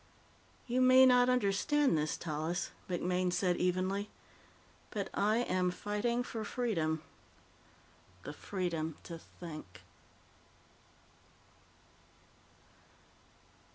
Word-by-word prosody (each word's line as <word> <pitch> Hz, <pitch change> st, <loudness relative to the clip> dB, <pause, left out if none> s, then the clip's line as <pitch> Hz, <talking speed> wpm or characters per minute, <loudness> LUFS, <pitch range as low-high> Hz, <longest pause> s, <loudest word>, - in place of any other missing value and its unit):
"You 250 Hz, +1 st, +1 dB
may 255 Hz, +1 st, +8 dB
not 250 Hz, -1 st, +5 dB
understand 250 Hz, -, +2 dB
this, 150 Hz, 0 st, 0 dB
Tallis," 160 Hz, +2 st, -3 dB, 0.2 s
MacMaine 180 Hz, 0 st, 0 dB
said 180 Hz, -1 st, +1 dB
evenly, 185 Hz, +3 st, 0 dB, 0.8 s
"but -, -, -4 dB
I 215 Hz, +4 st, +2 dB
am 185 Hz, -5 st, +1 dB
fighting 210 Hz, +6 st, -1 dB
for 225 Hz, -2 st, -5 dB
freedom. 165 Hz, -10 st, -1 dB, 1.2 s
The 145 Hz, -, -6 dB
freedom 165 Hz, -3 st, -3 dB
to 170 Hz, -1 st, -8 dB
think." 155 Hz, -, -10 dB
185 Hz, 85 wpm, -33 LUFS, 170-240 Hz, 1.2 s, may